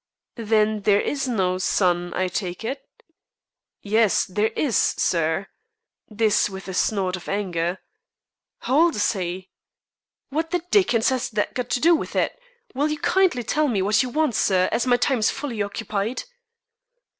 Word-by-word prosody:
"Then 215 Hz, -1 st, +1 dB
there 200 Hz, 0 st, +3 dB
is 275 Hz, +2 st, -2 dB
no 185 Hz, -6 st, 0 dB
'son,' 175 Hz, -2 st, +1 dB
I 185 Hz, -, 0 dB
take 180 Hz, +1 st, -4 dB
it." 270 Hz, +4 st, -4 dB, 1.0 s
"Yes, 215 Hz, 0 st, +2 dB
there 205 Hz, +4 st, 0 dB
is, 270 Hz, -9 st, 0 dB
sir," 165 Hz, +2 st, +1 dB, 0.6 s
this 215 Hz, -1 st, +2 dB
with 190 Hz, 0 st, -9 dB
a 190 Hz, -, -5 dB
snort 190 Hz, -1 st, 0 dB
of 180 Hz, -, -9 dB
anger. 180 Hz, -3 st, -1 dB, 0.8 s
"How 270 Hz, +4 st, +1 dB
old 335 Hz, -1 st, +4 dB
is 205 Hz, -, +2 dB
he?" 185 Hz, -1 st, -5 dB, 0.8 s
"What 320 Hz, +3 st, -2 dB
the 355 Hz, -1 st, -1 dB
Dickens 245 Hz, -, +3 dB
has 260 Hz, -2 st, -1 dB
that 210 Hz, -1 st, -2 dB
got 250 Hz, -1 st, -4 dB
to -, -, 0 dB
do 335 Hz, +6 st, +5 dB
with -, -, -5 dB
it? -, -, 0 dB, 0.4 s
Will 285 Hz, +4 st, 0 dB
you 305 Hz, -, -2 dB
kindly 345 Hz, -5 st, +2 dB
tell 300 Hz, +6 st, +1 dB
me 205 Hz, -8 st, 0 dB
what 210 Hz, +2 st, +3 dB
you 255 Hz, -, -2 dB
want, 305 Hz, -1 st, 0 dB
sir, 185 Hz, -3 st, +2 dB
as 235 Hz, +3 st, 0 dB
my 245 Hz, -1 st, +4 dB
time 255 Hz, 0 st, +1 dB
is 215 Hz, -, +3 dB
fully 255 Hz, -7 st, -4 dB
occupied?" 205 Hz, +2 st, -3 dB
215 Hz, 165 wpm, -23 LUFS, 190-260 Hz, 1.0 s, do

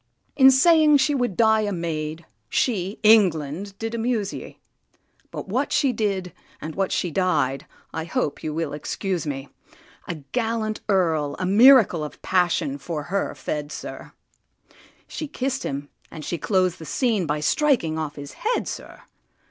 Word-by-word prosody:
In 265 Hz, -1 st, +8 dB
saying 305 Hz, +2 st, +6 dB
she 280 Hz, +2 st, +2 dB
would 245 Hz, -8 st, -1 dB
die 220 Hz, -1 st, +4 dB
a 205 Hz, -1 st, -1 dB
maid, 160 Hz, -2 st, -4 dB, 0.2 s
she, 200 Hz, -4 st, 0 dB
England! 195 Hz, -3 st, +3 dB
did 225 Hz, +1 st, -4 dB
amuse 225 Hz, -3 st, -1 dB
ye. -, -, -9 dB, 0.7 s
But -, -, -7 dB
what -, -, -1 dB
she 270 Hz, -4 st, +2 dB
did, 195 Hz, -6 st, -2 dB, 0.3 s
and 155 Hz, -, -6 dB
what 195 Hz, +2 st, -1 dB
she 175 Hz, -, -1 dB
died—I 160 Hz, -2 st, -2 dB
hope 155 Hz, -3 st, -2 dB
you 155 Hz, -, -2 dB
will 155 Hz, -1 st, -3 dB
excuse 175 Hz, +3 st, -3 dB
me: 135 Hz, -1 st, -5 dB, 0.6 s
A 170 Hz, -, -3 dB, 0.2 s
gallant 225 Hz, -2 st, -1 dB
Earl 160 Hz, -7 st, +1 dB
a 185 Hz, -, -2 dB
miracle 215 Hz, -, +6 dB
of 150 Hz, -, -8 dB
passion 175 Hz, -6 st, +1 dB
for 150 Hz, +1 st, -4 dB
her 200 Hz, -, -1 dB
fed, 150 Hz, -1 st, -4 dB
sir; -, -, -8 dB, 0.9 s
She 310 Hz, -, -5 dB
kiss'd 270 Hz, -1 st, -2 dB
him, 140 Hz, +1 st, -4 dB, 0.2 s
and 155 Hz, -2 st, -9 dB
she 170 Hz, -, -3 dB
clos'd 185 Hz, +1 st, +1 dB
the 160 Hz, -, -8 dB
scene 215 Hz, -, 0 dB
by 150 Hz, +1 st, -1 dB
striking 165 Hz, -, +1 dB
off 155 Hz, -2 st, -4 dB
his 145 Hz, 0 st, -9 dB
head, 470 Hz, +3 st, -1 dB
sir! -, -, -8 dB
185 Hz, 155 wpm, -23 LUFS, 155-225 Hz, 0.9 s, In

